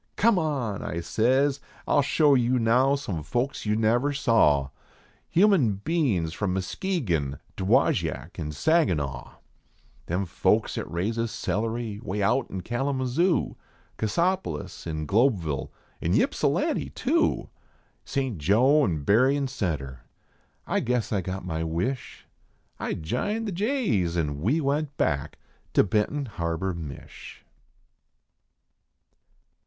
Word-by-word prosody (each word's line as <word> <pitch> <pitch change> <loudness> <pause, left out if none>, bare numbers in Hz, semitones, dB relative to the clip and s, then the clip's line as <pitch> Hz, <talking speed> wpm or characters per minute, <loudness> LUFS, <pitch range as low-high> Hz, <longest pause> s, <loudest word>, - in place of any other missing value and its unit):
"Come 215 -3 +4
on," 135 - -2
I 85 - -3
says, 130 +10 +2 0.3
"I - - +1
ll - - +6
show 145 +1 +3
you 125 -1 +3
now 125 +4 +3
some 100 - -4
folks 120 - -2
you 105 - +2
never 120 +6 +2
saw, 95 - +3 0.6
Human 175 - +4
bein 125 - 0
s 80 - -5
from 95 0 -1
Muskegon, 95 - -1 0.2
Dowagiac, 90 -3 +1
an 75 -2 -3
Saginaw; 75 - 0 0.7
Them 90 +3 -1
folks 85 - +1
at - - -6
raises 115 +7 -1
celery 110 0 -2
way 105 -2 -2
out 120 +6 +1
in 95 - -5
Kal 120 +9 -1
mazoo, 135 +7 +1 0.4
Cassopolis, 170 - -1
an 80 -1 -3
Globeville, 95 - +1 0.3
an 90 +6 +2
Ypsilanti, 275 - 0
too 325 +6 0 0.5
St. 130 - -2
Joe 125 - +4
and 80 - -1
Berrien 135 - +3
Centre." 80 - -3 0.7
I - - 0
guess 120 -2 -1
I 100 - +1
got 95 +1 -5
my 80 -2 -2
wish, 90 +11 -3 0.5
I - - -2
jined 210 - -2
the - - -2
jays 185 - 0
an 75 -4 -1
we 125 - +2
went 145 0 -1
back 70 -4 -1 0.4
to - - +5
Benton 105 +8 0
Harbor, 95 -3 -2
Mich. 80 -5 -9
110 Hz, 125 wpm, -26 LUFS, 85-140 Hz, 0.7 s, ll